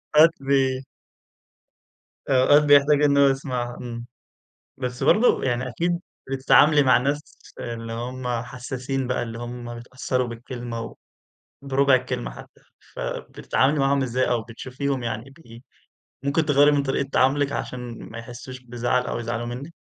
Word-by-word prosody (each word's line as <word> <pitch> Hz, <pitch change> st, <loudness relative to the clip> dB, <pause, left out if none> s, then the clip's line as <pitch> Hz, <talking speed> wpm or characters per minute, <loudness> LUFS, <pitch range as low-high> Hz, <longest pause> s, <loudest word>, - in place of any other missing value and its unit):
أوقات 160 Hz, +2 st, +8 dB
ب 135 Hz, -1 st, +2 dB, 1.5 s
أوقات 140 Hz, +3 st, +5 dB
بيحتاج 145 Hz, 0 st, +5 dB
إن 140 Hz, -1 st, +4 dB
هو 140 Hz, 0 st, +6 dB
يسمعها، 125 Hz, -3 st, -2 dB
امم 120 Hz, -1 st, -7 dB, 0.7 s
بس 125 Hz, 0 st, -4 dB
برضه 215 Hz, -, +4 dB
يعني 125 Hz, 0 st, -1 dB
أكيد 170 Hz, +7 st, -1 dB, 0.3 s
بتتعاملي 145 Hz, +3 st, +5 dB
مع 125 Hz, -3 st, +5 dB
الناس 140 Hz, +4 st, 0 dB, 0.4 s
اللي 115 Hz, -1 st, -5 dB
هُم 125 Hz, +2 st, -5 dB
حساسين 130 Hz, +1 st, -4 dB
بقى، 125 Hz, -, -1 dB
اللي 115 Hz, -1 st, -6 dB
هُم 120 Hz, 0 st, -6 dB
بيتأثروا 125 Hz, +1 st, -2 dB
بالكلمة 115 Hz, -1 st, -6 dB, 0.7 s
وبربع 135 Hz, 0 st, +3 dB
الكلمة 125 Hz, -1 st, -1 dB
حتى، -, -, -13 dB, 0.3 s
فبتتعاملي 140 Hz, +3 st, -1 dB
معاهم 140 Hz, 0 st, +2 dB
إزاي؟ 130 Hz, 0 st, 0 dB
أو 120 Hz, -2 st, +1 dB
بتشوفيهم 130 Hz, +3 st, -4 dB
يعني 115 Hz, +3 st, -4 dB
ب 120 Hz, -6 st, -15 dB, 0.6 s
ممكن 145 Hz, +3 st, +1 dB
تغيَّري 145 Hz, 0 st, +5 dB
من 145 Hz, -1 st, +2 dB
طريقة 135 Hz, 0 st, -1 dB
تعاملِك 140 Hz, +2 st, +2 dB
عشان 125 Hz, -4 st, -6 dB
ما 115 Hz, -, -9 dB
يحسوش 125 Hz, +2 st, -9 dB
بزعل 125 Hz, 0 st, -1 dB
أو -, -, -3 dB
يزعلوا 120 Hz, 0 st, -3 dB
منِّك؟ 130 Hz, +7 st, -6 dB
130 Hz, 135 wpm, -24 LUFS, 120-140 Hz, 1.5 s, أوقات